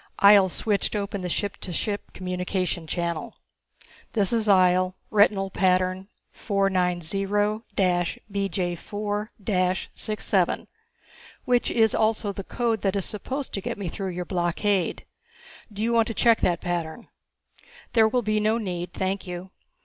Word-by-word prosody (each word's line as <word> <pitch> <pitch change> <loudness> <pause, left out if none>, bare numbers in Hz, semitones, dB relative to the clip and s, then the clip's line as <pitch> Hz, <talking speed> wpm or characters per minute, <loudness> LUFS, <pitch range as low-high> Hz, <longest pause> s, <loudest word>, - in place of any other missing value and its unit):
Ihjel 200 -1 +7
switched 205 +3 -1
open 200 -1 -2
the 180 - -3
ship 200 +3 -2
to 180 - -7
ship 205 +4 -3
communication 180 -2 -3
channel. 170 -1 -3 0.8
"This 205 -2 +1
is 225 -2 +1
Ihjel. 185 -1 +4 0.2
Retinal 200 -2 +3
pattern 185 0 +1 0.2
490 190 -2 0
BJ4 205 0 -1 0.6
67 215 -1 0 0.8
which 245 -1 +2
is 220 -2 +3
also 215 -1 +1
the 195 0 -6
code 230 +1 -1
that 195 0 0
is 195 - 0
supposed 265 +6 -4
to 195 - -2
get - - -4
me 200 -3 -4
through 190 +3 -4
your 180 0 -4
blockade. 180 +2 0 0.7
Do 205 +1 -4
you 235 +1 +1
want 230 -1 +4
to 225 - -4
check 230 -2 +4
that 175 -1 +1
pattern?" 175 +4 -3 0.9
"There 225 -2 +6
will 245 +2 0
be 215 0 +1
no 215 +2 +2
need, 180 -5 -4
thank 190 +1 -2
you. 180 +1 -6
195 Hz, 135 wpm, -25 LUFS, 180-215 Hz, 0.9 s, Ihjel